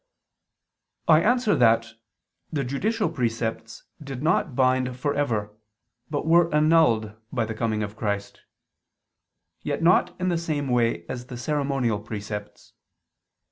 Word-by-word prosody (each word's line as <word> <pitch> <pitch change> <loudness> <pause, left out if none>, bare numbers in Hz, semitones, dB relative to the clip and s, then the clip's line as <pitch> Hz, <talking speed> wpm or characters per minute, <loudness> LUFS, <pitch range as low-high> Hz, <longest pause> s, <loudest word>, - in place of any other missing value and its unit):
I 155 -1 +6
answer 240 0 +2
that, 115 -1 +3 0.6
The 145 -4 -1
judicial 205 - -1
precepts 115 -5 -3 0.2
did 135 -1 -6
not 155 -3 +1
bind 130 -1 +1
for 140 +3 -1
ever, 110 -8 -1 0.5
but 145 0 -2
were 170 +1 +4
annulled 150 -9 +3 0.2
by 120 -4 0
the 110 - -4
coming 110 -1 -1
of 105 +1 -6
Christ: 100 -2 -3 1.2
yet - - -3
not 180 +1 +3
in 185 0 0
the 170 -2 0
same 150 -5 -2
way 115 -8 +1
as 125 -1 -6
the 125 - -7
ceremonial 135 -5 -1
precepts. 105 -1 -7
130 Hz, 130 wpm, -25 LUFS, 115-155 Hz, 1.2 s, I